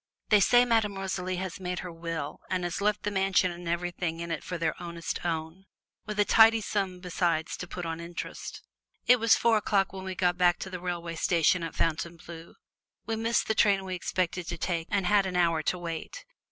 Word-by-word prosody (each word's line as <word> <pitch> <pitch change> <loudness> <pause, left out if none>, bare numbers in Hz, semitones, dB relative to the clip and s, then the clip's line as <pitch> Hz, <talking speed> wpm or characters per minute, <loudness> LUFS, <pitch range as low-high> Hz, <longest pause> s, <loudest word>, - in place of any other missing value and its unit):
They 210 - +6
say 245 +5 +5
Madame 220 -4 +1
Rosalie 185 -1 -2
has 185 0 -5
made 180 -1 -3
her 180 - -6
will 165 -3 -5
and 185 -1 -1
has 175 +2 -3
left 210 0 +1
them 205 - -2
the 190 - +1
mansion 190 -1 +3
and 175 0 -8
everything 170 -1 -2
in 170 0 -5
it - - -3
for 180 - -4
their 165 -1 0
ownest 170 -1 -5
own, 165 +2 -3 0.4
with 210 0 -4
a 205 - +5
tidy 225 +1 +6
sum 195 -4 -2
besides 170 -3 -1
to 180 - -6
put 175 0 -6
on 165 0 -4
interest." 170 +1 -7 0.4
It 250 0 +6
was 225 0 +5
four 230 -1 +3
o'clock 200 -2 +1
when 190 -1 -6
we 190 -1 -5
got 180 0 +1
back 175 -1 +4
to 190 - -5
the 180 - -5
railroad 170 -2 -4
station 170 +1 +3
at 165 - -5
Fontainebleau. 165 +1 -3 0.5
We 225 - -1
missed 225 +1 0
the 220 - +2
train 200 -3 +3
we 185 - -4
expected 180 -1 -2
to 175 - -4
take, 165 -1 -2
and 200 -2 0
had 200 +1 +3
an 185 - -4
hour 170 -3 +3
to 180 - -1
wait. 175 - -6
180 Hz, 215 wpm, -28 LUFS, 170-195 Hz, 0.5 s, They